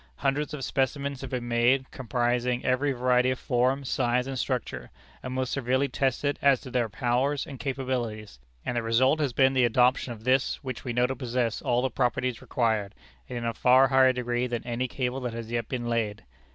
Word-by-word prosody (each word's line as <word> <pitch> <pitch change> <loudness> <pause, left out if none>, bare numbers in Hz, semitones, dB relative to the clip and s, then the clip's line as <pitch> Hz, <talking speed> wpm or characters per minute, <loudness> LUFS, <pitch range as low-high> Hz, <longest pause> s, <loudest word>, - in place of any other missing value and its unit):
Hundreds 140 - -1
of 150 -3 -5
specimens 140 0 -1
have - - -6
been 125 -2 -3
made, 120 +3 +2
comprising 125 -1 -1
every 135 +2 +2
variety 125 0 +2
of 130 - -1
form, 130 +1 +1
size, 125 -1 +1
and 135 -1 -4
structure, 120 - -3 0.3
and 130 - -6
most 130 -1 -1
severely 130 +1 +1
tested 135 +2 -1
as 140 -3 +4
to 130 - -10
their 120 -3 0
powers 130 +6 0
and 135 -3 -9
capabilities; 125 - -3 0.3
and 125 - -2
the 120 - +1
result 130 +6 +3
has 145 -4 0
been 130 +2 +3
the 130 -1 +3
adoption 125 +2 +3
of 110 -2 -9
this, 130 +2 +2
which 130 -3 -5
we 125 - -3
know 120 +1 +2
to 135 +1 -2
possess 120 -2 -2
all 120 +1 +1
the 130 - 0
properties 125 0 -1
required, 110 -5 -1 0.3
and 125 - -4
in 120 - -4
a 115 - -1
far 130 +3 +5
higher 130 -1 +5
degree 120 0 -1
than 120 -1 -4
any 120 +1 -2
cable 125 +1 -2
that 125 -3 -4
has 115 0 -6
yet 115 -2 -2
been 125 -2 -3
laid. 110 -3 -1
125 Hz, 205 wpm, -27 LUFS, 120-130 Hz, 0.3 s, far